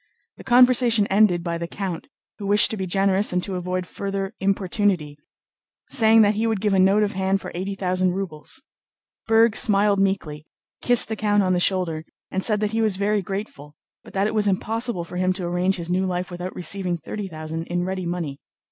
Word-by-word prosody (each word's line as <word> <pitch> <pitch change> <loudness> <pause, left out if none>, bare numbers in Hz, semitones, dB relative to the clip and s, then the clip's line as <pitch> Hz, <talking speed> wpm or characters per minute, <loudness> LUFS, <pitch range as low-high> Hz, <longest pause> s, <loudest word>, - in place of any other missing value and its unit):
The - - -11
conversation 245 -3 +5
ended 195 -4 +3
by 170 -1 -3
the 170 - -4
count, 180 -2 -5 0.3
who 200 - -5
wished 205 +1 +4
to - - -2
be 190 -1 -3
generous 195 +2 +2
and 180 0 0
to 195 - -2
avoid 180 0 -3
further 195 +1 -4
importunity, 190 -5 0 0.7
saying 225 -3 +5
that 205 0 +3
he 220 +2 -1
would 220 -3 0
give 205 0 0
a 190 - +3
note 195 +3 +4
of 205 - -1
hand 190 +1 0
for - - -8
eighty 190 +3 -4
thousand 185 -1 0
rubles. 180 -6 -5 0.6
Berg 225 0 +4
smiled 205 -3 +3
meekly, 160 -6 -1 0.3
kissed 245 -1 +3
the 220 - -3
count 205 -1 +1
on 185 -1 +1
the 180 - +1
shoulder, 175 -4 +1 0.3
and 190 - -2
said 210 -2 0
that 210 -1 0
he 225 0 0
was 215 -3 +1
very 205 +1 0
grateful, 185 -7 -7 0.3
but - - -15
that 195 +1 +1
it 215 - -1
was 210 -1 +1
impossible 220 0 -1
for 175 +1 -8
him 185 0 +1
to 185 -1 -5
arrange 180 +2 0
his 170 -1 -5
new 185 +1 +1
life 180 0 -3
without 180 +1 -6
receiving 180 0 -2
thirty 200 +4 -6
thousand 160 -1 -6
in 175 0 -1
ready 185 -1 -3
money. 165 -5 -4
190 Hz, 205 wpm, -23 LUFS, 180-210 Hz, 0.7 s, conversation